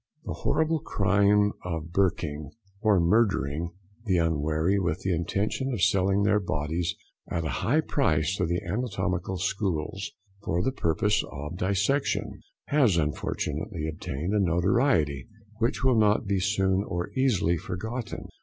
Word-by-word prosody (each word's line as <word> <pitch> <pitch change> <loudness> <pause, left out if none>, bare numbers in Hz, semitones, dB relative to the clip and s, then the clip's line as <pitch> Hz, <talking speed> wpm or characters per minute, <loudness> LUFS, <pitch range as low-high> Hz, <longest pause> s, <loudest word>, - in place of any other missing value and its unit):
The - - -3
horrible 160 +2 +1
crime 100 -1 +3
of 80 -2 -4
"Burking," 80 -6 0 0.3
or 105 -4 +4
murdering 85 -5 +2 0.4
the 95 -4 +2
unwary 80 +3 +1
with 90 -1 -1
the 95 - 0
intention 100 - -1
of 115 -8 -1
selling 100 -2 +3
their 105 +1 +3
bodies 80 -1 -2 0.3
at 85 -2 -2
a - - -1
high 150 +7 +3
price 95 - +1
to 90 - 0
the 85 +4 -1
anatomical 95 -3 -2
schools, 95 -1 -2 0.3
for 85 +2 0
the 130 - +1
purpose 105 - +1
of 75 +4 -6
dissection, 100 +10 0 0.3
has 130 - +4
unfortunately 80 +3 -2
obtained 80 +3 -4
a 105 - +3
notoriety 90 - +2 0.3
which 115 +2 0
will 130 -3 +4
not 105 +1 +3
be 100 -1 +1
soon 95 0 +1
or 90 -3 -4
easily 125 - +2
forgotten. 110 +8 -5
95 Hz, 135 wpm, -27 LUFS, 85-105 Hz, 0.4 s, or